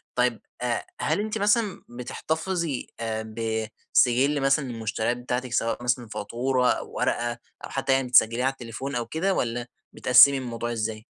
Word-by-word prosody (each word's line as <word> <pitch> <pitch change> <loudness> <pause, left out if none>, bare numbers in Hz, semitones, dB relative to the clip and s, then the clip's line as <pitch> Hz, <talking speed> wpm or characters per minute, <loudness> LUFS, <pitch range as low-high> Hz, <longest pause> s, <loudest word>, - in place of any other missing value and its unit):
طيب - - +1 0.2
آآ - - -1 0.2
هل - - +1
أنتِ 215 +1 -2
مثلًا، 210 0 +1
بتحتفِظي 160 +5 -3
آآ، 110 -1 -4 0.6
بسِجلّ 135 +4 +4
مثلًا 135 +1 +2
للمشتريات 115 0 -2
بتاعتِك، 125 0 -3
سواء 115 0 0
مثلًا 120 -1 0
فاتورة 125 +4 0
أو - - -4
ورقة 120 0 0 0.3
أو - - -10
حتى 135 0 0
يعني 135 -1 +1
بتسجِلّيها 120 0 +4
على 135 - +3
التليفون 130 +2 -6
أو 120 -1 -1
كده 165 +10 0
والّا 120 -5 -2 0.3
بتقسّمي 125 +3 +7
الموضوع 120 -2 -4
إزاي؟ 110 -1 -3
125 Hz, 150 wpm, -26 LUFS, 115-135 Hz, 0.6 s, بتقسّمي